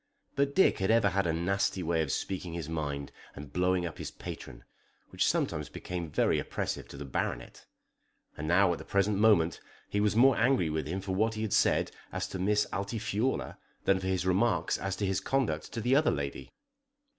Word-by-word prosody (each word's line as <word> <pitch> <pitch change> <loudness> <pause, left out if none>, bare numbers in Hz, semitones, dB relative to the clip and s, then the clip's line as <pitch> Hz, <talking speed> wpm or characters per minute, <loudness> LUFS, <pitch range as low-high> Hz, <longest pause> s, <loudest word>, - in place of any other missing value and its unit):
But 140 0 +1
Dick 190 - +4
had 95 - 0
ever 110 -3 +4
had 95 0 0
a - - +2
nasty 90 +2 0
way 80 0 +1
of 75 -4 -1
speaking 90 -3 -3
his 85 -3 -4
mind 70 -3 -3 0.2
and 75 -1 -10
blowing 90 0 +1
up 85 - -6
his - - -4
patron, - - -9 0.5
which - - +1
sometimes - - 0
became 90 -2 -5
very - - +2
oppressive - - -3
to - - -11
the 75 - -6
Baronet. 65 - -4 0.7
And 75 - -5
now 90 +2 +4
at 85 - -2
the - - -8
present 100 0 +1
moment 100 -7 +4 0.3
he 100 - 0
was 105 0 +2
more 130 +2 +6
angry 115 - +2
with 80 0 -2
him 95 +4 -3
for 95 0 -3
what 110 +3 +1
he 110 - -3
had 110 - -2
said - - +3 0.2
as 95 0 -3
to 95 - -5
Miss 105 +3 +2
Altifiorla 110 +4 -2 0.2
than 95 -1 +3
for 95 - -4
his 95 -1 0
remarks 95 -2 +2
as 95 0 -2
to 100 - -2
his 95 0 0
conduct 100 - -1
to 115 - -3
the 125 +4 +3
other 150 +2 +4
lady. 70 -1 -3
95 Hz, 205 wpm, -30 LUFS, 85-105 Hz, 0.7 s, more